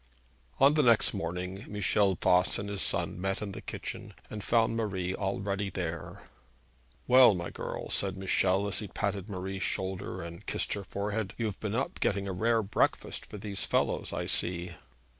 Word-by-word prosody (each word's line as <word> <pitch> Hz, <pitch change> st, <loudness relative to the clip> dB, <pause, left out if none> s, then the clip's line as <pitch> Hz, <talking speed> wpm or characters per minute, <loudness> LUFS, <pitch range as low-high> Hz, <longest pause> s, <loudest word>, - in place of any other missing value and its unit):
On 140 Hz, +2 st, +7 dB
the 155 Hz, -, +4 dB
next 115 Hz, -5 st, +5 dB
morning 90 Hz, +1 st, -4 dB
Michel 100 Hz, -1 st, +2 dB
Voss 90 Hz, 0 st, +4 dB
and 100 Hz, 0 st, -4 dB
his 100 Hz, -1 st, -2 dB
son 90 Hz, -, 0 dB
met 95 Hz, 0 st, 0 dB
in 105 Hz, -2 st, -4 dB
the -, -, -7 dB
kitchen, -, -, -6 dB, 0.2 s
and 105 Hz, -1 st, -5 dB
found 115 Hz, -1 st, +3 dB
Marie 95 Hz, -5 st, -1 dB
already 100 Hz, +1 st, -2 dB
there. 85 Hz, -3 st, -5 dB, 0.8 s
'Well, 125 Hz, -4 st, +7 dB
my 85 Hz, -1 st, -4 dB
girl,' -, -, -5 dB
said 95 Hz, -1 st, +1 dB
Michel, 95 Hz, +1 st, +2 dB
as 100 Hz, -, -1 dB
he 105 Hz, -, -4 dB
patted 100 Hz, 0 st, -3 dB
Marie's 95 Hz, 0 st, -4 dB
shoulder, 95 Hz, -1 st, -2 dB
and 85 Hz, +3 st, -8 dB
kissed -, -, -1 dB
her 100 Hz, -, -4 dB
forehead, 100 Hz, +1 st, -3 dB
'you've 110 Hz, -4 st, -2 dB
been 110 Hz, 0 st, -2 dB
up 130 Hz, -, -2 dB
getting 100 Hz, 0 st, 0 dB
a 95 Hz, -, -2 dB
rare 115 Hz, +4 st, +2 dB
breakfast 100 Hz, -, 0 dB
for -, -, -8 dB
these 100 Hz, -1 st, -1 dB
fellows, -, -, 0 dB
I -, -, -2 dB
see.' 90 Hz, 0 st, 0 dB
100 Hz, 175 wpm, -30 LUFS, 95-105 Hz, 0.8 s, On